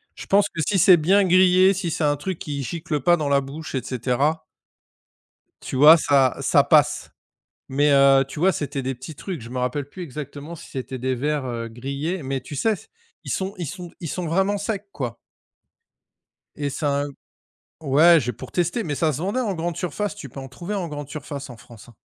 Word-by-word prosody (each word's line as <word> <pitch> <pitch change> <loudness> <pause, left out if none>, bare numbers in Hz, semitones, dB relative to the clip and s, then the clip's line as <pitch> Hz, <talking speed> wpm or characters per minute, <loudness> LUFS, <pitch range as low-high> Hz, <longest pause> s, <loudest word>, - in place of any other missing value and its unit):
Je - - -10
pense 200 +1 +4
que 165 - -4
si 200 - +2
c'est 180 0 +7
bien 190 +6 +4
grillé, 185 +1 +5
si 180 -2 -3
c'est 160 0 -2
un 145 0 +3
truc 180 +3 -4
qui 145 -2 -5
gicle 155 +1 -3
pas 175 +4 +4
dans 150 -2 -2
la 140 0 +3
bouche 145 +4 -8
et 130 - 0
cetera 135 +6 -1 1.2
tu - - -6
vois? 150 +5 +9
Ça 135 -5 +3
ça - - +4
passe, - - +3 0.6
mais 145 +2 +2
heu, 135 0 +6
tu 150 - -8
vois, 190 +1 +4
c'était 140 -2 -3
des 130 +1 -2
petits 130 +6 -9
trucs, 175 +1 -6
je 115 - -10
me 130 - -4
rappelle 135 +3 -2
plus 185 - -9
exactement 150 +1 -7
si 170 - -12
c'était 130 0 -5
des 130 +1 -1
vers, 145 +2 -1
heu, 115 -1 -4
grillés 140 +9 -4
mais 135 0 -3
tu 140 +2 -9
sais 225 +10 +2
s 205 - -8 0.4
ils - - -6
sont 190 +1 -2
ils 175 - -3
sont 175 +2 -7
ils 165 - -5
sont 180 +3 -3
vraiment 195 +5 +1
secs, 205 -1 -4
quoi. 120 -4 -5 1.4
Et 145 -1 -2
ça 140 0 -1
a 145 - -2
un - - -6 0.7
ouais, 160 +4 +6
j'ai 125 -3 -2
pour 130 - -10
tester 175 +6 0
mais 150 -4 -3
ça 160 +1 +1
se 130 - -3
vendait 200 +9 -1
en 215 -5 -1
grande 170 -1 -3
surface, 205 +4 -3
tu - - -9
peux 135 - -9
en 135 - -7
trouver 175 +9 -6
en 185 -4 -2
grande 145 -2 -7
surface 145 -2 -7
en 120 - -10
France, 120 -1 -15
hein. 115 - -18
150 Hz, 220 wpm, -23 LUFS, 135-175 Hz, 1.4 s, vois